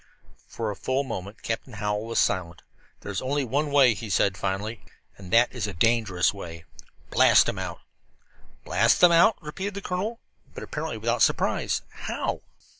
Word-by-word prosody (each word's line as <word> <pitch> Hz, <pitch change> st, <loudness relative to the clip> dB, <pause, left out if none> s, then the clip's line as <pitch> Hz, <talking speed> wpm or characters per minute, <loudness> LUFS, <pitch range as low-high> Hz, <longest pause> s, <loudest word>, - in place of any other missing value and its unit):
For 110 Hz, -2 st, -4 dB
a -, -, -6 dB
full 130 Hz, +7 st, -1 dB
moment 105 Hz, -5 st, -7 dB
Captain 115 Hz, +2 st, -4 dB
Hallowell 105 Hz, +1 st, -2 dB
was 115 Hz, -, -3 dB
silent. 85 Hz, -2 st, 0 dB, 0.4 s
"There 100 Hz, -, -6 dB
is 95 Hz, -, -3 dB
only 140 Hz, +2 st, 0 dB
one 145 Hz, +5 st, -1 dB
way," 135 Hz, -4 st, +5 dB
he 110 Hz, +1 st, -7 dB
said 95 Hz, 0 st, +2 dB
finally, 100 Hz, +4 st, -3 dB, 0.3 s
"and 95 Hz, -2 st, -12 dB
that 115 Hz, +2 st, +4 dB
is 120 Hz, -5 st, -3 dB
a 100 Hz, -, -5 dB
dangerous 105 Hz, -2 st, +2 dB
way. 85 Hz, -4 st, -9 dB, 0.5 s
Blast -, -, +6 dB
them -, -, -3 dB
out." -, -, -5 dB, 0.8 s
"Blast 115 Hz, +4 st, +3 dB
them 180 Hz, -, +7 dB
out?" 170 Hz, +6 st, +5 dB
repeated 190 Hz, +7 st, -5 dB
the 200 Hz, -, -5 dB
colonel, 205 Hz, +6 st, -3 dB, 0.4 s
but -, -, -6 dB
apparently -, -, -4 dB
without -, -, -1 dB
surprise. -, -, +1 dB
"How?" -, -, -4 dB
115 Hz, 170 wpm, -26 LUFS, 100-140 Hz, 0.8 s, them